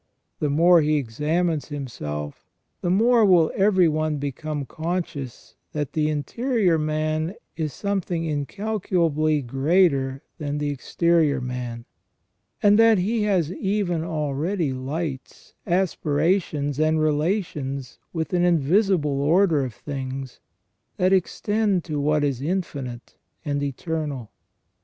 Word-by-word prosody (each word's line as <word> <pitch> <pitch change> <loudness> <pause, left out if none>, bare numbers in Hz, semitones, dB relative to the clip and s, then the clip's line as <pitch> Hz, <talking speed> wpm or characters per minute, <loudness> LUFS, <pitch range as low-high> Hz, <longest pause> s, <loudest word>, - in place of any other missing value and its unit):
The 150 - 0
more 170 +4 +5
he 155 0 +2
examines 150 +5 0
himself 75 - -6 0.3
the 175 - -1
more 230 +5 +4
will 180 -5 +5
every 190 -3 +4
one 155 -1 0
become 145 +1 -4
conscious 160 -5 -5 0.2
that 150 -3 -3
the 155 -1 +1
interior 185 - +1
man 155 +3 -1 0.2
is 155 -3 -2
something 180 -1 -2
incalculably 155 -2 0
greater 135 0 +2 0.2
than 145 -1 -3
the 145 0 -1
exterior 155 +1 +1
man; 125 -2 -5 0.8
and 205 +1 +6
that 225 -1 +6
he 215 +5 0
has 180 -5 +1
even 190 -4 -1
already 155 0 -1
lights, 135 +1 -5
aspirations, 160 -4 0
and 155 0 +2
relations 150 - -1
with 160 +1 -3
an 175 -1 +3
invisible 170 -3 +2
order 160 0 +3
of 125 -4 -5
things 135 -2 -6 0.6
that 185 +1 +3
extend 205 0 +1
to 150 -3 -3
what 150 +1 +2
is 135 -3 -1
infinite 140 -8 -4 0.3
and 145 -1 -1
eternal. 145 -3 -3
155 Hz, 115 wpm, -24 LUFS, 140-180 Hz, 0.8 s, and